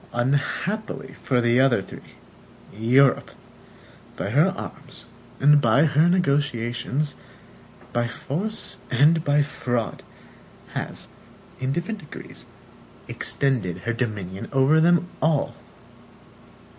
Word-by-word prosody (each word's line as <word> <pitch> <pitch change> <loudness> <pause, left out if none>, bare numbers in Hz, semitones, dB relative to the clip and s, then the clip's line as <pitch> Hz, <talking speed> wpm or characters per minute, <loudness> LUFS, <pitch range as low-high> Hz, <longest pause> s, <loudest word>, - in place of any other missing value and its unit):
Unhappily 145 - -2
for 125 -3 +1
the 120 +1 +3
other 130 -4 +4
three, 95 - -11 0.6
Europe, 125 +5 +3 0.9
by 100 - -3
her 150 +8 +4
arms - - -9 0.3
and 145 +1 +6
by 125 +6 +4
her 155 +3 +3
negotiations, 140 -4 0 0.8
by 120 0 +1
force 165 - -2
and 155 +6 +4
by 145 0 +3
fraud, 120 -5 -3 0.7
has, - - -5 0.5
in 130 +1 -1
different 175 +8 -3
degrees, 150 - -11 0.6
extended 120 -11 -1
her 120 - 0
dominion 105 -6 -4
over 135 +4 +4
them 175 +1 +4
all. 155 -2 +1
135 Hz, 100 wpm, -24 LUFS, 120-155 Hz, 0.9 s, and